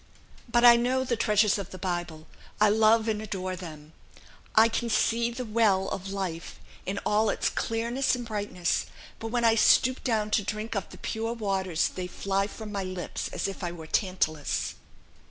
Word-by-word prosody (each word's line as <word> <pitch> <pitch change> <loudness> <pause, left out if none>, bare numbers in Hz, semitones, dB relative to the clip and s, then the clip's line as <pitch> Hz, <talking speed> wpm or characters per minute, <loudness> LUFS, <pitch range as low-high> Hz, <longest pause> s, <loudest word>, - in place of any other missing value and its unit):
But 240 +1 +4
I 240 -1 +9
know 255 +2 +1
the 250 -2 0
treasures 210 -2 +3
of 195 - -6
the 185 - -9
Bible; 175 -4 -4 0.3
I 215 0 +5
love 220 +1 +4
and 215 -1 -1
adore 185 -3 -4
them. 155 -3 -10 0.6
I 220 +1 +7
can 235 +1 -2
see 230 +1 +2
the 245 +1 -5
Well 210 -4 +2
of 195 +1 -5
Life 185 -4 -5 0.3
in 195 +2 -2
all 215 +1 +2
its - - 0
clearness 235 +4 0
and 245 -1 -6
brightness; 205 -5 -2 0.3
but 225 - -5
when 235 +1 0
I 225 - +6
stoop 255 +3 +4
down 215 -4 0
to 210 - +2
drink 215 +3 -4
of 200 - -3
the - - -12
pure 225 +1 -3
waters 190 -6 0
they 185 -1 -5
fly 195 +2 -1
from 215 0 -8
my 200 -2 -2
lips 185 -1 -4
as - - -3
if 195 0 -6
I 175 - -2
were 165 -2 -9
Tantalus. 155 -4 -1
210 Hz, 185 wpm, -27 LUFS, 185-230 Hz, 0.6 s, I